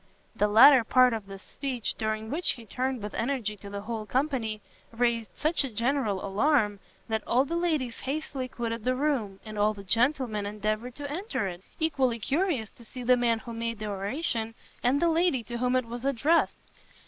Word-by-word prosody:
The 210 -2 +2
latter 250 +4 +8
part 255 +2 +5
of 215 -3 -4
this 195 -1 -10
speech, 260 -5 -3
during 220 0 -3
which 335 +5 +2
he 235 - -11
turned 255 +1 -2
with 210 - -5
energy 230 -4 -1
to 200 +1 -10
the 200 0 -5
whole 220 0 -5
company, 250 -4 -1 0.3
raised 230 -1 0
such 310 0 +1
a 270 - -3
general 230 -3 0
alarm, 210 0 +2 0.3
that 220 -1 -1
all 255 +3 +3
the 335 - -3
ladies 310 -9 0
hastily 275 -2 -3
quitted 230 -2 -4
the 255 +2 +1
room, 255 -9 -1
and 215 -1 -6
all 210 +1 +3
the 200 - -9
gentlemen 230 0 +1
endeavoured 215 +4 -3
to 285 -1 -6
enter 355 - -2
it, 175 -1 -6 0.2
equally 270 -7 +1
curious 275 - 0
to 235 - -15
see 250 +2 -8
the 250 +1 +5
man 240 -2 +2
who 230 +1 -8
made 230 0 -3
the 215 - -5
oration, 225 +3 -2 0.3
and 255 +4 +3
the 340 - +3
lady 330 -6 +2
to 240 +1 -5
whom 250 +1 +1
it 255 -1 +2
was 235 +1 -7
addressed. 275 +5 +2
235 Hz, 195 wpm, -28 LUFS, 215-270 Hz, 0.3 s, latter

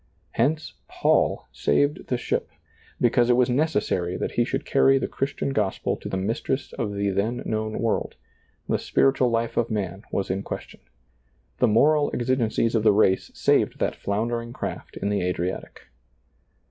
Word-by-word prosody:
Hence 150 +7 0
Paul - - +1
saved 145 +1 +1
the 125 - 0
ship! - - -2 0.5
because 120 0 +3
it 120 - +5
was 125 -1 +3
neces 140 -3 +1
sary 90 0 -1
that - - -2
he 120 - +2
should 135 +3 -3
carry 135 0 +4
the - - -1
Christian 140 0 -2
gospel 105 -7 0
to - - -7
the 95 - -2
mistress 115 +7 -2
of 105 -3 -3
the 100 0 0
then 105 +6 -1
known 110 0 -2
world; 115 -1 -1 0.5
the - - +1
spiritual 135 -2 +2
hfe 115 0 -1
of 120 -1 +1
man 100 -3 -3
was 95 -2 -1
in 95 +1 -1
question. - - -7 0.8
The 125 - +4
moral 145 +7 +4
exi 130 +2 +1
gencies 115 -1 0
of 115 - +2
the 105 0 +5
race 95 -2 +3
saved - - +2
that - - -1
floundering 115 +3 -2
craft - - -6
in 100 - -2
the 105 -1 0
Adriatic. 90 +1 -3
115 Hz, 170 wpm, -25 LUFS, 100-130 Hz, 0.8 s, it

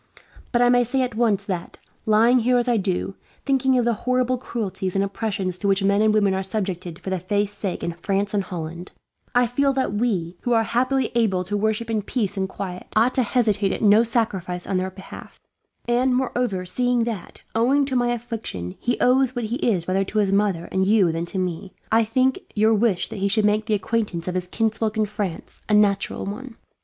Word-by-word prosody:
But 240 -1 +3
I 245 - +5
may 245 0 +5
say 260 +3 0
at 250 -1 -3
once 215 -3 +1
that, 180 -4 -4 0.3
lying 230 +4 +5
here 245 +2 +2
as 240 0 0
I 240 -2 +3
do, 190 -1 -1 0.3
thinking 265 -2 +2
of 245 - +2
the 235 - +2 0.2
horrible 255 0 +1
cruelties 200 -6 -4
and 195 - +2
oppressions 195 -3 -3
to 200 - -1
which 195 0 +2
men 200 +1 +3
and 215 0 +4
women 205 -2 +3
are 190 - -1
subjected 185 -4 -4
for 190 +1 -6
the 190 - 0
faith's 205 +3 -1
sake 195 -4 -4
in 170 - -1
France 200 +4 -2
and 205 - +2
Holland, 170 -2 -7 0.4
I 245 0 +5
feel 275 +3 +1
that 260 -6 -1
we, 190 -6 -1
who 245 - 0
are 225 -1 +4
happily 255 +3 0
able 210 -6 +1
to 200 +3 -3
worship 220 +2 0
in 215 -1 0
peace 205 -1 -2
and 190 -1 -2
quiet, 185 -2 -6
ought 230 +4 +4
to 260 - +2
hesitate 210 -4 +1
at - - -3
no 210 +1 +6
sacrifice 200 -7 -1
on 190 - -1
their 185 +1 -1
behalf; 190 0 -12 0.5
and 250 +1 +2
moreover, 245 -7 -1
seeing 245 +6 +1
that, 230 -5 -5
owing 265 +5 +3
to 270 -1 -3
my 245 -1 +2
affliction, 225 - -5
he 240 - -1
owes 255 0 +3
what 240 -2 -2
he 235 +3 -2
is 195 - 0
rather 190 +1 +1
to 210 - -5
his 200 -2 +2
mother 195 -4 +1
and 190 0 +1
you 200 -5 +4
than 165 +1 -3
to 190 - -6
me, 185 0 -3 0.2
I 225 0 +4
think 255 +4 +1 0.2
your 220 +1 +4
wish 215 -4 +1
that - - -7
he 195 - +1
should 210 +1 +2
make 210 +1 +1
the 215 - +2
acquaintance 205 -4 -2
of 180 - -1
his 180 -1 -2
kinsfolk 220 +1 -1
in 215 - +2
France 205 -5 -5
is - - -31
a - - +2
natural 200 -2 +2
one. 225 +5 -7
210 Hz, 220 wpm, -23 LUFS, 190-240 Hz, 0.5 s, no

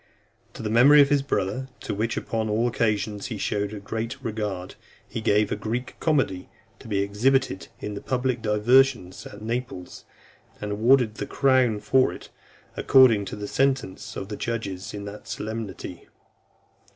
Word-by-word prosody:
To - - -7
the 105 - -2
memory 135 +6 +7
of 140 -1 +6
his 145 -1 +3
brother, 130 0 -2
to - - -4
which, 110 +3 -1
upon 110 -1 -2
all 110 +3 +1
occasions, 105 -3 -1
he 110 - -5
showed 100 +1 -1
a 105 - -6
great 115 +5 -4
regard, 105 -5 -4 0.3
he 115 - -5
gave 105 -1 +2
a - - +1
Greek 115 +4 -4
comedy, 135 - 0 0.3
to - - -12
be 100 -2 +1
exhibited 110 +1 +1
in 105 - -5
the 100 - -6
public 130 -2 -1
diversions 110 -2 +2
at 105 +1 -11
Naples, 115 -5 -5 0.5
and 105 0 -4
awarded 115 +2 +3
the - - -4
crown 130 -6 +2
for 130 -1 +3
it, - - -10 0.5
according 120 -6 +5
to - - -6
the 105 0 -6
sentence 135 -7 -1
of 95 - -6
the 105 - -5
judges 100 -6 -4
in 100 0 -6
that 100 +1 -9
solemnity. 105 -5 -6
110 Hz, 165 wpm, -25 LUFS, 105-125 Hz, 0.5 s, memory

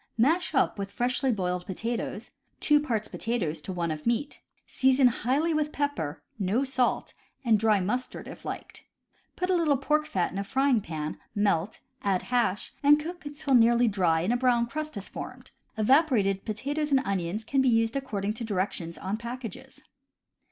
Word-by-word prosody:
Mash 315 +8 +2
up 260 - +2
with 195 0 -3
freshly 250 +4 0
boiled 180 -4 -2
potatoes, 225 +2 -4 0.3
two 295 -1 +4
parts 230 -8 -1
potatoes 175 -10 -2
to 190 - -5
one 170 -2 -1
of 155 +4 -5
meat. 240 +5 -1 0.2
Season 265 0 +3
highly 275 +8 0
with 305 -1 0
pepper 230 - -2 0.2
(no 205 +7 +1
salt) 260 -2 0 0.3
and 220 -3 +4
dry 215 -1 +3
mustard 245 +7 -3
if - - -10
liked. - - -7 0.5
Put 365 +1 -1
a - - +4
little 315 -5 +3
pork 300 +3 +1
fat 185 - 0
in 195 - -4
a - - -1
frying 265 +2 +2
pan, 155 -3 -5 0.2
melt, 200 -2 0 0.2
add 195 -2 +1
hash, 240 -5 0
and 295 +1 +6
cook 340 +1 -6
until 290 -1 -2
nearly 235 0 +5
dry 180 -6 +2
and 195 +8 +1
a - - +2
brown 245 -2 +3
crust 305 +3 -5
has 200 -1 -6
formed. - - -8 0.3
Evaporated 215 - +3
potatoes 285 +8 -2
and 270 -2 +4
onions 195 +2 -2
can 270 +4 +1
be 265 - +3
used 225 0 +2
accord 260 -8 -3
ing 210 - 0
to 230 - -6
directions 185 -5 -2
on 195 +3 -3
packages. 245 +2 -8
235 Hz, 175 wpm, -28 LUFS, 195-275 Hz, 0.5 s, and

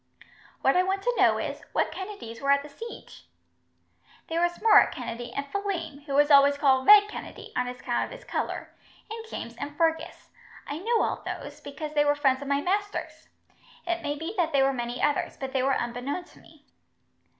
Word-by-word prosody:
"What 270 - +3
I 360 - +5
want 385 +1 -1
to - - +1
know - - +4
is, - - -4
what - - +1
Kennedys 380 - -7
were 275 - -1
at 280 0 +4
the 295 - -10
siege?" 455 +11 -10 1.0
"There 330 +1 0
was 345 0 0
Murroch 425 -1 +6
Kennedy, 240 -1 -6
and 280 +3 -3
Phelim, 340 -5 -4
who 275 - -2
was 290 +1 +4
always 280 0 +7
called 265 -2 +3
'Red 415 0 +9
Kennedy', - - -9
on 250 0 0
account 250 0 -2
of - - -11
his - - -10
colour; - - -4 0.4
and 450 0 -5
James 235 - -6
and 290 0 -6
Fergus. 325 0 -1 0.3
I 290 +2 -5
knew 455 +5 +1
all - - -2
those, - - -7
because 295 +2 -7
they 295 -1 +4
were 290 0 +3
friends 270 -2 +2
of 280 - -6
my 280 0 +1
master's. 405 +4 -3 0.6
It 345 -1 -1
may 290 - -2
be 325 +6 -5
that 325 -3 +1
there 275 -1 +4
were 270 - +2
many 240 -1 -4
others, 295 -1 0
but 270 -1 -5
they 265 - +1
were 270 +1 +2
unbeknown 245 +8 -3
to 350 - -19
me." 305 -2 -20
290 Hz, 200 wpm, -27 LUFS, 270-360 Hz, 1.0 s, Red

